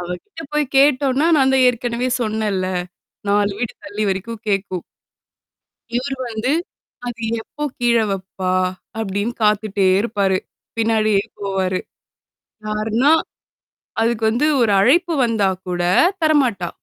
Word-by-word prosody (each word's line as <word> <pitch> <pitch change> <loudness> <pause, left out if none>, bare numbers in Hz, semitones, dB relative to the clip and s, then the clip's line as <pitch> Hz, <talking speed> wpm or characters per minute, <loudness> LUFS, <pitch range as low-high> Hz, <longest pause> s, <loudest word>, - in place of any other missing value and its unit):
அவகிட்ட 180 - -7
போய் 300 -1 +2
கேட்டோனா, 280 +2 +4
நான் 265 -1 +3
தான் 260 -1 +5
ஏற்கனவே 245 +1 -1
சொன்னேன்ல. 215 -4 -1 0.6
4 205 0 +2
வீடு 240 - -3
தள்ளி 205 +1 -2
வரைக்கும் 210 +4 -4
கேக்கும். 195 -3 -1 1.1
இவரு 270 +3 -1
வந்து, 225 +3 -1 0.6
அது 235 -1 -5 0.2
எப்போ 295 +6 -8 0.2
கீழ 240 -1 +3
வப்பா? 190 -1 -3 0.5
அப்படின்னு 205 +2 -2
காத்துட்டே 210 -2 +2
இருப்பாரு. 200 -3 +1 0.4
பின்னாடியே 215 -3 +2 0.2
போவாரு. 190 -2 -1 0.9
யாருனா 220 +6 +1 0.9
அதுக்கு 230 -1 +1
வந்து 245 +7 +1
ஒரு 225 -3 +3
அழைப்பு 340 - +4
வந்தா 220 -4 +2 0.2
கூட 175 -1 -2 0.4
தரமாட்டா. 255 - +2
220 Hz, 110 wpm, -20 LUFS, 200-250 Hz, 1.1 s, தான்